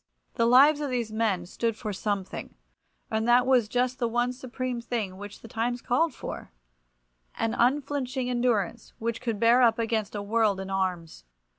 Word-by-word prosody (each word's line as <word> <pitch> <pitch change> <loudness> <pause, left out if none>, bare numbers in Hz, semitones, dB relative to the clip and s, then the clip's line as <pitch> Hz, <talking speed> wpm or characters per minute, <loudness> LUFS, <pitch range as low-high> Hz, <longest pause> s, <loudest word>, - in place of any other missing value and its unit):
The 230 -1 +2
lives 285 +5 +6
of 290 - -2
these 240 -4 -2
men 215 -5 0
stood 230 +5 -2
for 215 -1 -5
something, 195 -1 -4 0.6
and 220 +1 0
that 245 +1 +5
was 250 -5 +3
just 250 +1 0
the 235 - +1
one 240 +2 0
supreme 255 -1 -4
thing 225 -6 -3
which 205 +1 -9
the - - -10
times 235 +2 -2
called 310 +8 +1
for—an - - -8
unflinching 265 0 0
endurance 240 -4 -1
which 230 0 -3
could 230 -4 -2
bear 235 +2 +5
up 230 -2 +4
against 220 -3 -1
a 205 - -3
world 210 -2 +1
in 190 0 -6
arms. 180 - -2
230 Hz, 165 wpm, -27 LUFS, 200-245 Hz, 0.6 s, lives